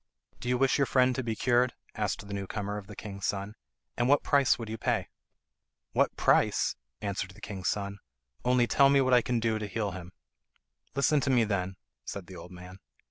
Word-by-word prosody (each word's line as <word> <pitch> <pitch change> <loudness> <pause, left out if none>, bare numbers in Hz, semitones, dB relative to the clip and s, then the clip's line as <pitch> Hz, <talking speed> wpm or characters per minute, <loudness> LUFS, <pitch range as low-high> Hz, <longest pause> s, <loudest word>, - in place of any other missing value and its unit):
"Do 125 - -4
you 125 - +2
wish 135 +2 +2
your 140 - +3
friend 130 -1 +3
to 130 - -2
be 115 -3 -2
cured?" 125 +1 +2 0.2
asked 105 -1 -2
the 100 - -6
new 100 -1 -3
comer 105 0 -3
of 100 - -13
the - - -10
king's 100 -2 -5
son. 100 +1 -3 0.4
"And 120 +1 +1
what 145 - +4
price 140 -2 +4
would 115 - -6
you 110 +1 -5
pay?" - - 0 0.8
"What - - +2
price?" - - +3 0.3
answered 100 -2 -2
the - - -14
king's 100 -5 -5
son; 100 -1 -3 0.4
"only 125 -1 +3
tell 140 +3 +5
me 140 0 +5
what 130 -1 +3
I 125 - +7
can 120 0 0
do 110 -1 0
to 105 - -4
heal 105 0 -2
him." 90 -1 -9 0.8
"Listen 145 +2 +3
to 140 - -1
me, 125 -3 +4
then," 95 -3 -1 0.3
said 100 -3 -6
the 95 - -11
old 90 - -10
man. 90 +1 -11
110 Hz, 210 wpm, -29 LUFS, 100-125 Hz, 0.8 s, I